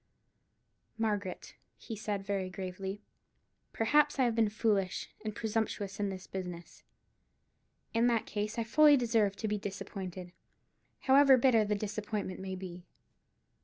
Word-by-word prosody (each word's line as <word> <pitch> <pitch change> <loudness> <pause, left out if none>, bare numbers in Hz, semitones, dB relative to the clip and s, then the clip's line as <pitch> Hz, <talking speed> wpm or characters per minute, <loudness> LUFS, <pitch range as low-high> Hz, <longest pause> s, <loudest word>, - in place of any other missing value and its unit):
"Margaret," 205 -4 -2 0.2
he 225 - -7
said, 205 -2 -3
very 195 -2 -1
gravely, 190 +2 -6 0.7
"perhaps 295 +6 +3
I 265 - +3
have 240 -2 +2
been 225 -2 +3
foolish 205 -3 0
and 215 -1 -4
presumptuous 215 -3 -2
in 205 -1 0
this 190 -1 -7
business. 180 -2 -7 1.1
In 230 +1 +3
that 230 -2 +1
case 210 +2 -3
I 230 - +1
fully 295 +5 +6
deserve 225 -5 +2
to 220 - -3
be 210 0 -1
disappointed, 190 -2 -6 0.7
however 270 0 +6
bitter 235 -4 +4
the 210 0 0
disappointment 205 -2 -4
may 190 0 -4
be. 180 -1 -8
210 Hz, 130 wpm, -32 LUFS, 190-225 Hz, 1.1 s, fully